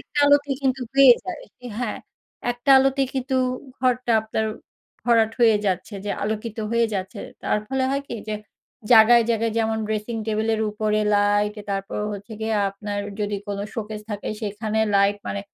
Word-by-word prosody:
একটা - - -7
আলোতে 285 0 +4
কিন্তু 265 -1 +1
হয়ে 275 -2 +9
যায়। 360 -5 -6 0.4
হ্যাঁ, 245 -3 -2 0.5
একটা 245 +3 -1
আলোতে 270 +1 +2
কিন্তু 265 0 -2 0.4
ঘরটা 250 -2 +1
আপনার 220 0 -2 0.6
ভরাট 230 -2 +4
হয়ে 225 -2 +6
যাচ্ছে 190 +2 -2
যে 205 - -2
আলোকিত 215 +2 -3
হয়ে 235 0 +3
যাচ্ছে। 190 -1 -4 0.2
তার - - +1
ফলে 265 -1 0
হয় 275 +1 -1
কি - - -4
যে 215 - -1 0.6
জায়গায়, 235 +1 +8
জায়গায় 225 0 0
যেমন 220 0 0
ড্রেসিং 220 +2 -3
টেবল 215 0 0
এর 220 - -2
উপরে 215 0 0
লাইট, 205 0 +2 0.2
তারপরে 195 +1 -3
হচ্ছে 205 +2 -8
গিয়ে 220 0 -1 0.2
আপনার 205 +1 -5 0.2
যদি 205 0 -1
কোন 200 -1 -3 0.2
শোকেজ 215 -1 -5
থাকে 205 -1 -4
সেখানে 215 +1 -3 0.2
লাইট। 200 +1 +4
মানে 200 - -3
220 Hz, 160 wpm, -23 LUFS, 210-240 Hz, 0.6 s, হয়ে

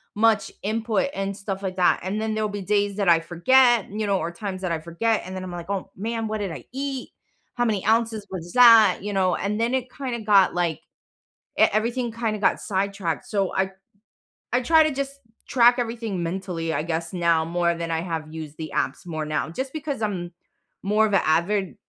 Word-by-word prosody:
much 220 -1 +2
input 220 +4 0
and 195 0 -2
stuff 195 -1 -5
like 185 -1 -4
that, 180 - +3
and 205 +3 -2
then 220 0 -1
there'll 215 -1 -1
be 205 -1 -5
days 205 0 0
that 195 -4 +2
I 165 -1 +6
forget, 235 +7 +3
you 215 +1 -3
know, 195 -2 +1
or 170 - -3
times 190 +1 -6
that 180 -2 -2
I 165 - -1
forget 190 +8 -1
and 185 0 -7
then 185 - -5
I'm 180 - -6
like, 175 +1 -7
"Oh 195 -1 -3
man, 225 +2 -3
what 215 0 -2
did 195 -4 -3
I - - -8
eat? 270 -1 -4 0.5
How 240 0 +1
many 210 -4 0
ounces 220 -2 +1
was 175 -2 -7
that?" 230 -6 +7
You 205 0 -4
know, 185 -2 +2
and 210 +2 -2
then 235 +2 +1
it 255 -1 -1
kinda 255 -4 -4
got, 200 -3 +4
like 175 -3 -1 0.8
e - - +7
everything 235 +2 0
kinda 225 -2 -2
got 205 - +2
sidetracked, 195 -4 -2
so 195 -3 -1
I 190 0 +1 0.8
I 245 - +3
try 320 +4 +5
to 310 - +1
just 275 0 -4 0.3
track 240 -2 +5
everything 225 -6 -3
mentally, 170 -2 -3
I - - 0
guess, 165 +1 -3
now 170 -2 +2
more 170 0 0
than 170 0 -4
I 160 - 0
have 160 -3 -5
used 155 -2 -8
the 155 -2 -6
apps 130 +6 -1
more 155 -2 -4
now, 155 +1 -2
just 260 +10 -4
because 295 -5 -4
I'm 180 -5 -2 0.5
more 210 +2 +3
of 205 - -4
a 195 - +3
avid, 180 +4 +1
200 Hz, 210 wpm, -24 LUFS, 175-225 Hz, 0.8 s, that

